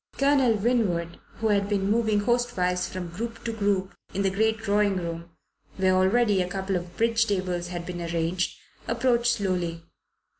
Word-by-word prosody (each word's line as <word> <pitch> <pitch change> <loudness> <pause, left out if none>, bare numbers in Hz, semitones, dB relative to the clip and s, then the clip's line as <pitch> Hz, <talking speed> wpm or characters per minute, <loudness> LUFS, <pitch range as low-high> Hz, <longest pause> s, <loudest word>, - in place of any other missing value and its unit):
Colonel 275 -4 +4
Winwood, 200 -7 0 0.2
who 225 -1 -1
had 200 -1 +2
been 200 -1 +1
moving 220 -2 +2
hostwise 205 -6 0
from 180 -2 -5
group 225 +6 -6
to 230 - -2
group 200 -3 0 0.2
in 200 - 0
the 195 - +2
great 220 +3 +1
drawing 205 -2 +1
room, 170 -1 -4 0.5
where 190 -1 +3
already 195 +2 +3
a 180 - -2
couple 190 +1 -2
of 175 -1 -5
bridge 230 0 +2
tables 185 -3 -1
had 175 -1 -5
been 175 -1 -5
arranged, 170 +2 -1 0.3
approached 240 -2 +2
slowly. 180 -5 -2
195 Hz, 160 wpm, -26 LUFS, 180-225 Hz, 0.5 s, Colonel